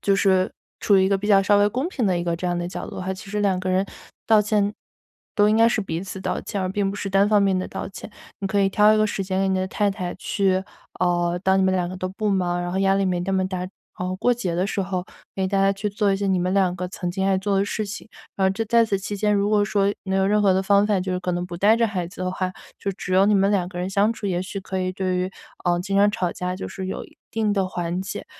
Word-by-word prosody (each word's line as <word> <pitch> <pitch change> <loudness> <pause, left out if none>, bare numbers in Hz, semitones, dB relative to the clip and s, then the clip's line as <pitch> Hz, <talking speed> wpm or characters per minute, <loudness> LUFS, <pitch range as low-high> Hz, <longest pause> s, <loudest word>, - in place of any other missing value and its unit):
就 200 - +2
是 190 -1 +2 0.3
处 200 - +3
于 190 - +4
一 - - +2
个 195 0 +2
比 205 - -4
较 195 -2 +6
稍 205 +1 +4
微 205 0 +4
公 260 +9 -2
平 255 - -1
的 185 - +2
一 - - -2
个 170 -1 -1
这 180 - -4
样 175 0 0
的 175 0 -3
角 - - -6
度 - - -9
的 - - -4
话， 190 +1 -2
其 190 +2 -10
实 210 0 -1
两 195 -3 +2
个 185 - -3
人 185 +1 +2 0.4
道 220 -1 +6
歉， 210 -1 +1 0.6
都 205 - +4
应 215 - +3
该 230 +1 +6
是 230 - 0
彼 165 -2 -4
此 190 0 -7
道 - - -2
歉， 205 - -4
而 - - 0
并 200 0 0
不 200 - -6
是 200 -1 -4
单 195 +1 +4
方 210 -1 +4
面 195 -2 +2
的 185 - -3
道 - - -5
歉。 195 - -9 0.3
你 195 - -1
可 205 +1 0
以 195 - +3
挑 210 +2 +5
一 - - +2
个 215 0 +3
时 200 - -2
间 190 0 -2
给 195 - +1
你 190 0 +1
的 185 - -1
太 205 +1 +1
太 180 -2 -4
去 190 -1 0 0.4
呃， 175 -1 +1
当 190 0 +4
你 - - +3
们 190 0 +2
两 180 -1 0
个 185 - -6
都 185 0 -3
不 205 +2 -2
忙， 175 -2 0
然 175 0 -3
后 190 - -1
压 195 0 +3
力 195 0 +1
没 180 -2 0
那 185 +2 -2
么 190 -1 +1
大， 185 -1 -4
然 180 - -4 0.4
后 185 - -3
过 245 +5 +2
节 185 -8 -3
的 185 +3 0
时 200 - -2
候， 185 -1 -3 0.3
给 190 -1 -1
大 195 0 0
家 195 0 +4
去 200 +2 -3
做 205 0 +1
一 195 - +1
些 200 - -2
你 190 -1 +2
们 180 +1 0
两 185 -2 +2
个 180 0 -4
曾 180 -2 -4
经 190 +2 -1
爱 195 -1 +3
做 195 +1 0
的 195 - +2
事 215 +1 -2
情。 205 +2 -8 0.3
然 195 - +1
后 - - +3
这 220 +4 -2
在 235 +2 +4
此 205 -3 -1
期 200 +2 -5
间， 210 +1 +1
如 200 0 +1
果 210 -1 +4
说 200 -1 +1
能 190 0 0
有 190 - +2
任 210 +1 +3
何 195 - +5
的 190 - +1
方 200 +1 +4
法， 210 -2 +2
就 185 0 -2
是 180 - -2
可 180 0 -2
能 175 0 -2
不 175 -1 -7
带 210 +4 +5
着 230 0 +3
孩 185 -5 -3
子 185 - -8
的 185 - -1
话， 185 0 -2 0.3
就 200 - -2
只 185 0 -6
有 190 +1 +5
你 210 - +4
们 195 0 +3
两 185 -4 +1
个 180 - -8
人 180 - -2
相 200 +2 +3
处， 220 - -6
也 180 -2 0
许 195 +1 -6
可 190 0 -4
以 185 - -1
对 185 -1 -1
于， 185 +1 -1 0.3
呃， 175 -1 +2
经 195 +2 -2
常 205 +1 +5
吵 180 -4 -2
架 180 0 -3
就 195 - -5
是 190 -1 -6
有 190 - -4
一 - - -18
定 220 -2 0
的 195 -2 +1
缓 175 0 -3
解。 195 - -6
195 Hz, 340 characters per minute, -23 LUFS, 185-205 Hz, 0.6 s, 较